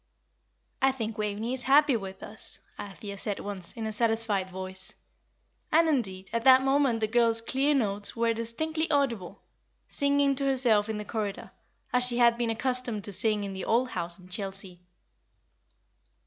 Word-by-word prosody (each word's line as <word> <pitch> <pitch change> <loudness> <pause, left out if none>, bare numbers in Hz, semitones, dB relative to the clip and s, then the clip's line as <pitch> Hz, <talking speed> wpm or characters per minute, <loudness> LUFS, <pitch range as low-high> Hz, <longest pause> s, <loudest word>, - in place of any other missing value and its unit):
"I 270 0 +4
think 225 -4 -5
Waveney 210 +3 -2
is 260 - -3
happy 280 +1 +4
with 195 -3 -6
us," 215 - -10 0.2
Althea 200 0 -8
said, 205 -1 -3
once, 195 -4 -4
in 225 -2 -5
a 220 - -3
satisfied 220 -4 0
voice; 185 0 -5 0.8
and, 325 +1 +4
indeed, 195 -11 -1
at 230 0 -1
that 260 0 +7
moment 270 -4 +2
the 215 - +1
girl's 230 0 +3
clear 270 +5 +1
notes 205 -5 -1
were 230 0 +1
distinctly 310 +8 -2
audible, 235 - -1 0.4
singing 280 -1 +1
to 275 - -1
herself 240 -6 +3
in 220 - -2
the 210 - -6
corridor, 210 -3 -4 0.4
as 250 0 +3
she 245 -1 +2
had 235 -1 +5
been 235 -1 -1
accustomed 240 -2 0
to 205 - -7
sing 210 +1 +3
in 200 -1 -5
the 190 -1 -5
old 245 +3 +1
house 170 -4 -4
in 180 -1 -16
Chelsea. 190 -1 -4
225 Hz, 165 wpm, -28 LUFS, 200-255 Hz, 0.8 s, that